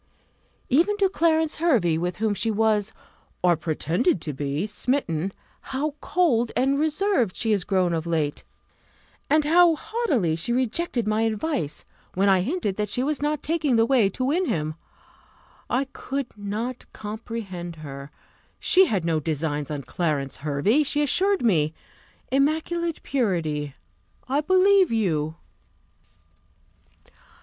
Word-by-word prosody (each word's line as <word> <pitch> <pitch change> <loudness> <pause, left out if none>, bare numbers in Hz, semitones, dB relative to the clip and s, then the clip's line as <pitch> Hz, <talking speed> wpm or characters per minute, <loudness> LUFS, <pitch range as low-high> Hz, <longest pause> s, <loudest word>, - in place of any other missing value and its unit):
Even 345 +10 +3
to 395 -2 +3
Clarence 320 -3 +1
Hervey, 240 - +2
with 175 +2 -2
whom 215 +1 0
she 205 +3 -1
was, 215 -1 +1 0.5
or 175 -1 +5
pretended 165 - 0
to 150 - -4
be, 145 +5 -2
smitten, 205 - -1 0.3
how 285 +3 -3
cold 245 -11 +1
and 270 +2 +2
reserved 310 - +1
she 225 - 0
is 200 -4 +2
grown 185 -3 +1
of 165 0 -2
late; 155 -3 -1 0.9
and 305 0 +3
how 335 +1 +5
haughtily 285 - 0
she 170 +8 -3
rejected 250 0 0
my 215 +1 +1
advice, 225 - -2 0.3
when 195 +2 +3
I 190 -2 +4
hinted 230 - -2
that 210 0 -1
she 250 - -1
was 295 0 -1
not 300 0 -1
taking 310 -5 +1
the 225 0 +4
way 235 -5 +3
to 255 +6 -3
win 335 +7 +1
him! 155 -1 -1 1.0
I 260 +3 +1
could 275 -2 -4
not 215 +5 -4
comprehend 210 -5 -6
her; 140 -3 -8 0.5
she 380 0 +5
had 190 - -1
no 165 -2 +1
designs 150 -2 -2
on 145 -2 -4
Clarence 145 -6 -2
Hervey, 150 - +1
she 295 0 +1
assured 385 +6 +2
me. 160 -8 +2 0.6
Immaculate 320 +4 0
purity! 160 - -1 0.5
I 275 +3 +1
believe 375 +1 +4
you. 160 -9 0
225 Hz, 135 wpm, -24 LUFS, -, 1.0 s, or